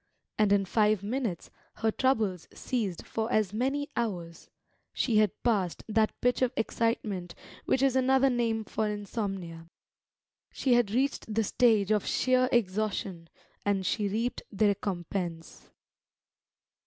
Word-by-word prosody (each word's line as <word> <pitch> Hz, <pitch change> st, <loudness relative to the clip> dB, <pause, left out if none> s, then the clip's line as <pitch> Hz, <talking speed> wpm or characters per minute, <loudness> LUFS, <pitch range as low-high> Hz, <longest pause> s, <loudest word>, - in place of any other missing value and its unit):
And 210 Hz, -2 st, +4 dB
in 200 Hz, -1 st, +3 dB
five 210 Hz, 0 st, +2 dB
minutes 220 Hz, -, -3 dB, 0.2 s
her 225 Hz, 0 st, 0 dB
troubles 215 Hz, -10 st, 0 dB
ceased 210 Hz, -9 st, -3 dB
for 225 Hz, +1 st, -3 dB
as 215 Hz, -4 st, +1 dB
many 275 Hz, +6 st, -1 dB
hours; 180 Hz, -8 st, -4 dB, 0.4 s
she 230 Hz, -4 st, +1 dB
had 215 Hz, -1 st, +5 dB
passed 200 Hz, -8 st, 0 dB
that 220 Hz, 0 st, +1 dB
pitch 245 Hz, +1 st, +2 dB
of 255 Hz, -2 st, +3 dB
excitement 215 Hz, -6 st, -1 dB, 0.3 s
which 265 Hz, -, +2 dB
is 270 Hz, -1 st, +3 dB
another 265 Hz, +1 st, +4 dB
name 230 Hz, -2 st, 0 dB
for 215 Hz, 0 st, -2 dB
insomnia; 195 Hz, -5 st, -4 dB, 0.8 s
she 260 Hz, -, +1 dB
had 240 Hz, -4 st, +3 dB
reached 255 Hz, 0 st, -1 dB
the 220 Hz, +1 st, +1 dB
stage 215 Hz, -2 st, +3 dB
of 210 Hz, -2 st, +1 dB
sheer 255 Hz, 0 st, +2 dB
exhaustion, 195 Hz, -5 st, -1 dB, 0.3 s
and 200 Hz, -2 st, 0 dB
she 210 Hz, +1 st, 0 dB
reaped 230 Hz, +5 st, -2 dB
the 205 Hz, 0 st, +3 dB
recompense. 175 Hz, -3 st, -4 dB
215 Hz, 130 wpm, -29 LUFS, 195-240 Hz, 0.8 s, had